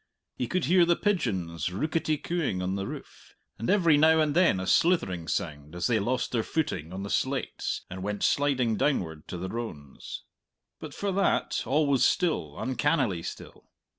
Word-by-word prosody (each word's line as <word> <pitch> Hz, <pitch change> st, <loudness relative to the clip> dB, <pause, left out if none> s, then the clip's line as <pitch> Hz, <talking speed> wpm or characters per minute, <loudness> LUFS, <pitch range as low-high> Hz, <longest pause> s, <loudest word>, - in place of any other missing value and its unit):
He 125 Hz, -, -2 dB
could 180 Hz, +6 st, 0 dB
hear 180 Hz, +1 st, +5 dB
the 170 Hz, 0 st, +4 dB
pigeons 95 Hz, -, -1 dB
rooketty 155 Hz, -, -1 dB
cooing 165 Hz, -, -2 dB
on 95 Hz, +1 st, -1 dB
the 100 Hz, 0 st, -3 dB
roof, -, -, -10 dB, 0.2 s
and 115 Hz, -, -3 dB
every 170 Hz, -7 st, +5 dB
now 160 Hz, +2 st, +5 dB
and 155 Hz, -2 st, +1 dB
then 170 Hz, -, +4 dB
a 95 Hz, -, -3 dB
slithering 95 Hz, -, +2 dB
sound, 75 Hz, -2 st, -3 dB
as 90 Hz, -, -2 dB
they 115 Hz, -3 st, +2 dB
lost 120 Hz, +3 st, -1 dB
their 115 Hz, -, +1 dB
footing 110 Hz, -, -2 dB
on 95 Hz, +1 st, -5 dB
the 100 Hz, -, -5 dB
slates 135 Hz, 0 st, -2 dB
and 95 Hz, +1 st, -7 dB
went 105 Hz, +1 st, -3 dB
sliding 130 Hz, -6 st, +2 dB
downward 80 Hz, -, -1 dB
to 90 Hz, -, -5 dB
the 90 Hz, +2 st, -4 dB
rones. 95 Hz, -, -7 dB, 0.6 s
But 155 Hz, -2 st, -8 dB
for 200 Hz, -1 st, -2 dB
that, 195 Hz, +1 st, +1 dB
all 150 Hz, +5 st, +3 dB
was 135 Hz, -3 st, +2 dB
still, 155 Hz, -, +1 dB
uncannily 130 Hz, -, 0 dB
still. -, -, -9 dB
125 Hz, 175 wpm, -28 LUFS, -, 0.6 s, hear